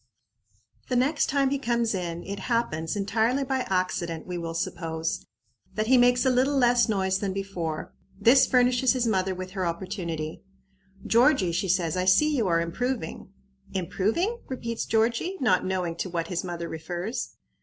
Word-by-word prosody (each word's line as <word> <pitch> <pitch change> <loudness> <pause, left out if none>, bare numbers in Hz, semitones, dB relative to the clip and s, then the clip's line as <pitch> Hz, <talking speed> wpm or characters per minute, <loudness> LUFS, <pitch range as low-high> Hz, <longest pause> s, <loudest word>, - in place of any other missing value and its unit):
The 250 - 0
next 275 +5 +2
time 275 -1 +1
he 280 - 0
comes 235 -3 0
in 175 -2 -3
it 200 0 -5
happens 165 -9 0
entirely 225 +6 +1
by 265 -1 -1
accident, 175 -3 -1
we 180 - -5
will 165 -1 -4
suppose 165 -1 -3 0.5
that 215 - 0
he 260 +4 +4
makes 245 +1 +4
a 260 - +4
little 265 +3 +2
less 245 -2 +4
noise 190 -2 +1
than 195 -2 -2
before. 180 -5 -4 0.3
This 240 +6 +6
furnishes 250 0 +3
his 250 -2 0
mother 190 -4 +1
with 185 0 -6
her 190 -1 -3
opportunity. 170 -2 -4 0.6
"Georgie," 235 - +4
she 180 +3 -1
says, 170 -3 +1
"I 180 0 0
see 295 +12 +4
you 230 -7 +1
are 165 -1 +2
improving." 225 +3 -3 0.5
"Improving?" 220 - 0
repeats 230 -3 -4
Georgie, 230 - +1
not 205 -9 +2
knowing 180 -3 -1
to 185 - -3
what 170 -1 -3
his 180 -2 -2
mother 170 -2 -4
refers. 175 +8 -5
195 Hz, 165 wpm, -26 LUFS, 175-245 Hz, 0.6 s, This